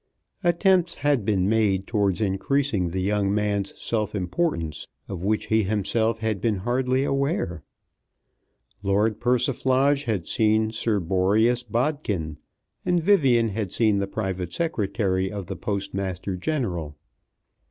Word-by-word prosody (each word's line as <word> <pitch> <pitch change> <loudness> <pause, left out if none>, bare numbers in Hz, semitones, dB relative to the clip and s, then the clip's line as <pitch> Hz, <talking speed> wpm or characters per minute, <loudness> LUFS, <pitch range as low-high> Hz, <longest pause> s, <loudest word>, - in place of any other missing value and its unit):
Attempts 175 0 +3
had 145 -5 +1
been 95 -2 +1
made 100 -3 +2
towards 100 -3 0
increasing 105 0 0
the 95 +2 -2
young 100 0 +1
man's 100 -1 -1
self 105 -2 -2
importance, 90 - -2 0.2
of 95 -4 -6
which 105 +3 0
he 110 0 +2
himself 110 +3 0
had 110 -3 -2
been 115 -3 +1
hardly 125 +6 0
aware. 140 - -1 1.2
Lord 105 +2 +1
Persiflage 130 +3 +2
had 105 -7 -1
seen 110 0 +2
Sir 110 -1 0
Boreas 100 +7 +2
Bodkin, 115 - -2 0.5
and 175 -1 +2
Vivian 135 - +3
had 100 -2 -3
seen 110 -3 +2
the 100 - -1
private 95 -4 -3
secretary 100 - -1
of 100 -2 -5
the 95 - -5
Postmaster 95 -1 -3
General. 90 - -3
105 Hz, 125 wpm, -24 LUFS, 95-125 Hz, 1.2 s, Attempts